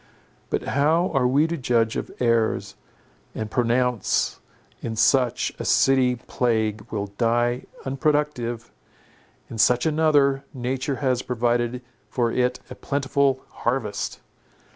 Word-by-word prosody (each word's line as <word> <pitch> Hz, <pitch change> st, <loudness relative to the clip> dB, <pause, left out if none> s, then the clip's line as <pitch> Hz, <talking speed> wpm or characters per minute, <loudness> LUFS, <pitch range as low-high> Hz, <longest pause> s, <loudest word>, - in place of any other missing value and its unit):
But -, -, -1 dB
how 160 Hz, +6 st, +2 dB
are 130 Hz, -2 st, +3 dB
we 140 Hz, +5 st, +3 dB
to 165 Hz, +1 st, -2 dB
judge 115 Hz, -4 st, +1 dB
of -, -, -3 dB
airs, 115 Hz, -2 st, +1 dB, 0.6 s
and 110 Hz, -1 st, -4 dB
pronounce—in 120 Hz, -1 st, -1 dB
such 125 Hz, +1 st, +2 dB
a -, -, -3 dB
city 130 Hz, -2 st, +3 dB
plague 110 Hz, -3 st, -1 dB
will 100 Hz, -2 st, -3 dB
die 120 Hz, +1 st, +1 dB, 0.2 s
unproductive; 135 Hz, -4 st, -1 dB, 0.8 s
in 110 Hz, -, -8 dB
such 125 Hz, +4 st, +4 dB
another, 150 Hz, -3 st, +3 dB
nature 130 Hz, +2 st, -2 dB
has 130 Hz, -1 st, +2 dB
provided 120 Hz, 0 st, -1 dB, 0.3 s
for 120 Hz, -2 st, 0 dB
it 125 Hz, +1 st, 0 dB
a -, -, -8 dB
plentiful 140 Hz, -1 st, 0 dB
harvest? 115 Hz, -4 st, -2 dB
125 Hz, 115 wpm, -24 LUFS, 115-135 Hz, 0.8 s, such